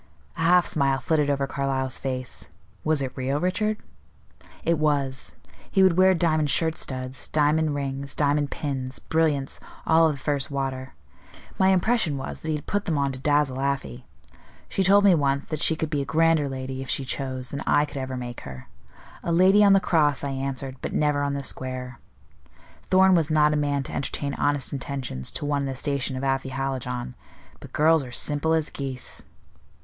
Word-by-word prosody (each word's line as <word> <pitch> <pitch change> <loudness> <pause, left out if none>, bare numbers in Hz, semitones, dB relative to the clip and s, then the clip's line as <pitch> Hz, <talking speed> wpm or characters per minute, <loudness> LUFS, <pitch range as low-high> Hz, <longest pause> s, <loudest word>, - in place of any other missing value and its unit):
A - - -12
half 175 +2 +5
smile 135 -3 +1
flitted 150 -2 +1
over 140 -1 +1
Carlyle's 135 -2 -2
face. 130 -1 -4 0.3
"Was 155 -3 +2
it 130 -1 -5
real, 135 +2 -1
Richard?" 210 +5 0 0.9
"It 165 -2 +1
was. 140 -3 0 0.4
He 195 - +3
would 185 -3 +5
wear 185 +1 +5
diamond 155 -3 +1
shirt 160 +2 +2
studs, 130 0 -4
diamond 150 0 +2
rings, 140 0 -4
diamond 145 0 +1
pins; 135 -3 -4
brilliants, 155 -4 0 0.3
all 160 0 +5
of - - -1
the - - -10
first 140 -1 0
water. 135 -2 -4 0.6
My 190 - +5
impression 190 - +2
was, 135 - -5
that 160 - -6
he 150 -1 0
put 205 +6 -2
them 160 -4 0
on 140 -1 +1
to 130 - -6
dazzle 145 -2 +1
Afy. 135 - -3 0.6
She - - -1
told 200 +2 +6
me 200 -2 +7
once 140 -3 +1
that 155 -2 -4
she 160 - +3
could 160 0 -3
be 145 -2 0
a - - -3
grander 160 -1 +2
lady, 130 0 -5
if 135 - -8
she 135 - -1
chose, 130 0 -4
than 140 - -5
I 145 - +4
could 145 - -9
ever 130 -1 -4
make 120 -1 -6
her. 65 -2 -10 0.5
'A 170 - -1
lady 190 +4 +5
on 200 -1 +7
the 195 - +6
cross,' 150 -7 +2
I 140 - -2
answered, 135 0 -4
'but - - -4
never 150 -1 +1
on 140 0 -1
the 140 - -4
square.' 130 -2 -5 0.9
Thorn 190 0 +5
was 165 -3 +2
not 150 -1 +4
a - - +1
man 145 -2 0
to - - -8
entertain 140 +1 -2
honest 145 -1 0
intentions 130 - -4
to - - -3
one 145 -1 0
in 140 - -2
the 135 - -4
station 135 -1 -1
of 130 - -5
Afy 135 0 0
Hallijohn; 130 -2 -3 0.5
but - - -12
girls 160 0 +4
are 125 - -9
simple 145 +5 +1
as 160 -1 0
geese." 135 -3 -5
140 Hz, 190 wpm, -25 LUFS, 135-160 Hz, 0.9 s, me